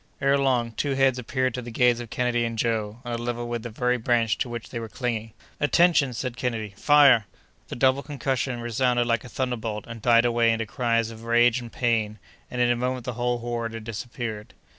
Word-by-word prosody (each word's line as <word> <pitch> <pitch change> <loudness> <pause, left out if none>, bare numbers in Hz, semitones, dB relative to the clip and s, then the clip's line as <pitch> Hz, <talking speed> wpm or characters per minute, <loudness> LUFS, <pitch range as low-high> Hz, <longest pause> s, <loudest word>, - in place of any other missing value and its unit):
Ere 140 0 +3
long, 130 -4 +1
two 135 +5 -2
heads 135 -1 +3
appeared 130 0 -1
to 125 - -4
the 120 - -8
gaze 120 +1 +3
of 120 -2 -7
Kennedy 120 0 0
and 115 -1 -3
Joe, 110 0 -1
on 120 - -4
a - - -1
level 120 0 -3
with 120 -1 -3
the 120 - -6
very 125 +3 0
branch 115 -1 +1
to 125 - -1
which 120 -1 -6
they 115 - -4
were 115 -1 -6
clinging. 115 -2 -3 0.3
"Attention!" 155 -2 +4
said 125 +1 -4
Kennedy. 115 -5 -3
"Fire!" 135 -4 +5 0.4
The - - -6
double 130 +2 +3
concussion 135 -4 -2
resounded 120 +1 +1
like 115 -2 0
a 125 - -10
thunderbolt 115 -4 -3
and 115 -1 -9
died 115 0 +5
away 120 -1 +3
into 115 0 -1
cries 115 0 0
of 115 0 -11
rage 120 +1 +4
and 120 -1 -9
pain, 110 -3 0 0.3
and 125 - -5
in 120 0 +4
a - - +2
moment 125 0 -2
the 125 - -3
whole 120 +1 -1
horde 115 -1 -3
had 115 - -7
disappeared. 110 -1 -6
120 Hz, 215 wpm, -25 LUFS, 115-125 Hz, 0.4 s, Fire